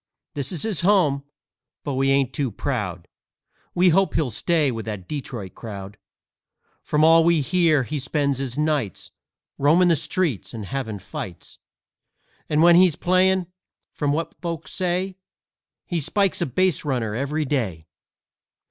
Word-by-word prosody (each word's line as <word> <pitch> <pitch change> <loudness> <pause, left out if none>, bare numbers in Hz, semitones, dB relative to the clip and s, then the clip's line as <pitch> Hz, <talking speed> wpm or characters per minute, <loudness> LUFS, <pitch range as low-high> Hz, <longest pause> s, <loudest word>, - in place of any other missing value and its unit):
This 140 -2 -3
is 175 - -2
his 215 -7 0
home, 170 -8 +3 0.6
but 145 - -3
we 135 +1 +1
ain't 135 -2 +2
too 140 -3 -1
proud. 90 -4 -4 0.7
We 180 +1 +5
hope 195 +3 +2
he'll 140 -6 0
stay 155 -2 +1
with 115 -2 -5
that 105 -5 -6
Dee 145 -2 -3
troit 105 -9 -8
crowd. 100 -3 -8 0.9
From 150 +1 +1
all 165 +1 +7
we 170 -2 +3
hear, 160 -2 +2
he 145 +4 -4
spends 140 0 0
his 135 -1 -4
nights 150 - -1 0.5
Roamin' 165 +6 +4
the 170 - +5
streets 135 - -2
and 110 -3 -6
havin' 115 -3 -4
fights. 95 -2 -8 0.9
And 155 +1 +3
when 170 0 +7
he's 180 -4 +5
playin', 185 +1 +2 0.5
from 145 -2 -1
what 160 +3 -2
folks 170 -3 -5
say, 185 +1 -1 0.7
He 175 - -2
spikes 190 +4 0
a 170 - +1
baserunner 135 - 0
every 145 +5 -1
day. 110 - -2
145 Hz, 150 wpm, -23 LUFS, 125-170 Hz, 0.9 s, all